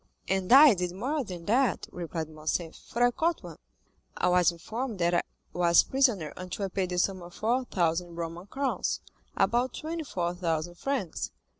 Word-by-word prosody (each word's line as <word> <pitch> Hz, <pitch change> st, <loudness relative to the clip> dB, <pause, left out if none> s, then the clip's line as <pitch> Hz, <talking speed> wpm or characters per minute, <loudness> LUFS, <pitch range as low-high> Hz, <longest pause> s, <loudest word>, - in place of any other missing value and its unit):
"And 190 Hz, +1 st, 0 dB
I 275 Hz, 0 st, +10 dB
did 180 Hz, -2 st, -2 dB
more 275 Hz, +8 st, -1 dB
than 180 Hz, -6 st, -8 dB
that," 240 Hz, +2 st, +2 dB
replied 165 Hz, -2 st, -4 dB
Morcerf, 155 Hz, +2 st, -3 dB
"for 240 Hz, -, -3 dB
I 245 Hz, -, +5 dB
caught 330 Hz, +6 st, 0 dB
one. -, -, -10 dB, 0.6 s
I -, -, +2 dB
was 180 Hz, 0 st, +4 dB
informed 220 Hz, +7 st, -5 dB
that 175 Hz, 0 st, +1 dB
I 175 Hz, -, +4 dB, 0.3 s
was 170 Hz, -1 st, +5 dB
prisoner 240 Hz, -, +1 dB
until 185 Hz, +2 st, -4 dB
I -, -, -4 dB
paid 185 Hz, -1 st, -1 dB
the 180 Hz, -, -3 dB
sum 185 Hz, +1 st, +1 dB
of 175 Hz, 0 st, -11 dB
4,000 180 Hz, -8 st, 0 dB
Roman 170 Hz, +2 st, -5 dB
crowns—about 255 Hz, -1 st, -1 dB
24,000 175 Hz, -, -2 dB
francs. 205 Hz, -, -3 dB
185 Hz, 155 wpm, -28 LUFS, 175-245 Hz, 0.6 s, I